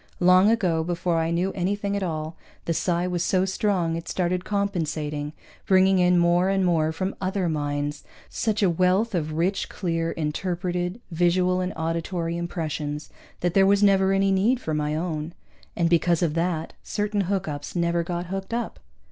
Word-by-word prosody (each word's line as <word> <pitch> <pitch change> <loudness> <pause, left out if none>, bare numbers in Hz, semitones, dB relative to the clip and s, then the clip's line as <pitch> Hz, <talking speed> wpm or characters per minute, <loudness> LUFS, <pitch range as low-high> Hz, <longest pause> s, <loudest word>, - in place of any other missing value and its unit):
Long 185 +3 +6
ago, 180 -8 +2
before 175 0 0
I 165 0 0
knew 175 +3 0
anything 200 +2 -1
at 200 - -1
all, 160 -3 -3 0.3
the 165 - 0
psi 175 +1 0
was 180 -1 -1
so 185 0 +2
strong 190 -4 0
it 165 - -6
started 180 0 -1
compensating, 155 -8 -2 0.4
bringing 190 0 +5
in 180 0 +4
more 175 +2 +3
and 195 -1 +2
more 160 -3 +2
from 185 +4 -3
other 190 -1 0
minds 145 -1 -2 0.2
such 215 -2 -1
a 190 - +5
wealth 185 +6 +2
of 155 -3 -1
rich, 180 +5 0
clear, 165 -3 -2
interpreted 175 +4 -2
visual 180 +2 +2
and 180 +1 -2
auditory 165 +1 -2
impressions 155 -3 -4 0.3
that 175 -1 0
there 195 0 +5
was 200 +1 +4
never 195 -1 +4
any 195 0 +2
need 215 +7 +2
for 160 - -3
my 150 0 -1
own. 160 0 -3 0.4
And 170 - +2
because 170 0 +2
of 160 -3 +1
that, 165 -1 -1
certain 205 -1 -1
hookups 160 -7 -3
never 170 0 +1
got 175 +1 -3
hooked 195 +4 -4
up. 240 - -4
175 Hz, 170 wpm, -25 LUFS, 165-190 Hz, 0.4 s, Long